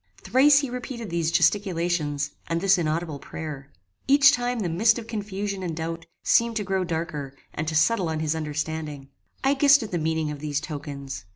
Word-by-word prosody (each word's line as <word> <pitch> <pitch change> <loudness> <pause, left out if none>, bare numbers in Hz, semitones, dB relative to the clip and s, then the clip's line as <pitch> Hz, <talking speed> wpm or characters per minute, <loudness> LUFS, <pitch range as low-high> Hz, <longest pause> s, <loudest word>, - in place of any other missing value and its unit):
Thrice 275 +2 +5
he 275 - -3
repeated 240 -4 -6
these 170 -2 0
gesticulations 165 -5 +1 0.2
and 165 +1 0
this 195 0 +4
inaudible 155 -2 -2
prayer. 140 -1 -7 0.4
Each 280 +1 +7
time 245 -3 -1
the 185 - -1
mist 215 +8 +3
of 235 - -6
confusion 205 -3 -4
and 170 -3 -4
doubt 165 0 -4 0.2
seemed 235 0 +3
to 215 - -1
grow 190 -1 0
darker 160 -5 -4 0.2
and 155 - -3
to 160 - -2
settle 175 +3 +3
on 160 -1 -2
his 155 0 0
understanding. 155 -2 -4 0.3
I 270 +1 +4
guessed 285 -1 +5
at 215 - -7
the 175 - -1
meaning 160 -1 -1
of 145 - -7
these 145 -1 -2
tokens. 140 - -7
165 Hz, 185 wpm, -25 LUFS, 155-215 Hz, 0.4 s, Each